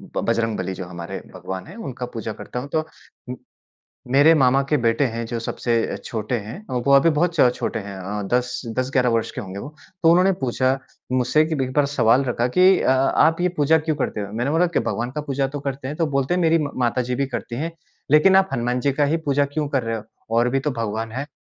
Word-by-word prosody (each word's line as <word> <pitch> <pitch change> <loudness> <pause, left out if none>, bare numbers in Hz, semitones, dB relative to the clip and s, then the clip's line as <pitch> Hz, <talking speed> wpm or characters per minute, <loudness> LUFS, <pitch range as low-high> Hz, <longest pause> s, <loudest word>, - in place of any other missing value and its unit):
ब - - 0
बजरंगबली 115 -4 -1
जो 95 0 -6
हमारे 85 +2 -7 0.2
भगवान 95 +1 -6
हैं, 180 - -11
उनका 135 - -6
पूजा 110 -1 -4
करता 125 - -6
हूँ। 140 +3 -7
तो 155 0 +1 1.3
मेरे 145 +4 +6
मामा 135 -3 +4
के 150 - +3
बेटे 115 +2 +2
हैं 115 0 -3
जो 115 0 -4
सबसे 115 0 -1
छोटे 110 +1 -3
हैं, 115 - -9
वो 130 +2 +1
अभी 140 +5 +5
बहुत 165 +2 +1
छ 135 -6 +5
छोटे - - -3
हैं 100 -1 -8
अ, 100 +3 -4
10, 125 0 0 0.2
10-11 130 -1 +1
वर्ष 115 -1 0
के - - -6
होंगे 95 -1 -7
वो। 145 +8 -9 0.3
तो 165 - +7
उन्होंने 185 +3 +5
पूछा 130 +1 +1 0.3
मुझसे 130 +5 +3
कि 160 0 -2
भी 135 -3 0
एक 130 - -7
बार 145 0 +3
सवाल 130 -2 +3
रखा 120 -1 0
कि, 185 +8 +5
"अ, - - +3
आप 150 +5 +3
ये 180 - +2
पूजा 150 +2 +4
क्यों 155 0 -1
करते 130 -6 -2
हो?" 100 0 -6
मैंने 120 +5 -1
बोला 170 +3 +3
कि, 170 - 0
"भगवान 120 +2 -2
का 150 - -4
पूजा 140 -2 -1
तो 145 +2 -6
करते 135 -1 -4
हैं," 145 - -4
तो 165 - +1
बोलते 135 +4 0
हैं, 180 - +1
"मेरी 165 0 +4
म 145 -3 -2
माता 120 +1 +1
जी 125 - 0
भी 140 +2 0
करती 120 -2 -5
हैं, 160 +7 -3 0.4
लेकिन 170 +6 +6
आप 190 0 +4
हनुमान 125 0 0
जी 140 +2 +1
का 145 +1 +2
ही - - +2
पूजा 140 0 +3
क्यों 145 +1 -3
कर 135 -3 0
रहे 115 0 -2
हो? 105 - -8 0.3
और 120 +1 +3
भी 135 +2 +1
तो 145 +2 -1
भगवान 110 +1 -3
हैं।" 135 +5 -4
130 Hz, 240 wpm, -22 LUFS, 115-150 Hz, 1.3 s, तो